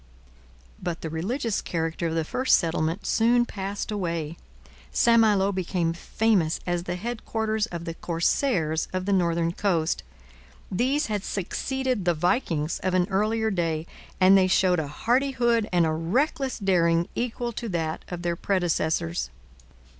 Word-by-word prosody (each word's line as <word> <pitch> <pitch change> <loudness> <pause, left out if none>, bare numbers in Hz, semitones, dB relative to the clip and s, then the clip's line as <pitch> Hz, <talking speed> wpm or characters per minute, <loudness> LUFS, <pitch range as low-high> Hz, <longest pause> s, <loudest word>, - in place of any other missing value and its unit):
But 175 -1 -3
the 160 - -5
religious 215 - -1
character 165 0 -2
of 165 - -2
the 165 - +1
first 255 +11 +3
settlement 165 +2 -1
soon 240 +2 +3
passed 200 -1 -4
away. 170 -6 -2 0.6
St 230 0 +4
Malo 205 -3 +4
became 180 -3 -1
famous 180 -2 +1
as 175 -1 -1
the 175 - -2
headquarters 220 +1 -2
of 170 -4 -6
the 165 - -4
corsairs 165 - 0
of 185 0 -2
the 200 - +1
northern 170 -2 +1
coast. 175 -3 0 0.7
These 260 +10 +1
had 210 -3 -2
succeeded 255 +5 -2
the 175 -1 +3
Vikings 165 - 0
of 185 0 0
an 180 -1 +2
earlier 220 +3 +1
day, 165 -4 -1 0.3
and 190 +1 +7
they 190 -1 +5
showed 185 -1 +3
a 155 - -2
hardihood 240 - +1
and 175 -2 +3
a 160 - +1
reckless 260 - 0
daring 170 -3 +2
equal 240 0 -2
to 235 0 -5
that 165 -3 -2
of 175 -1 -6
their 170 0 0
predecessors. 160 - 0
185 Hz, 145 wpm, -26 LUFS, 165-220 Hz, 0.7 s, and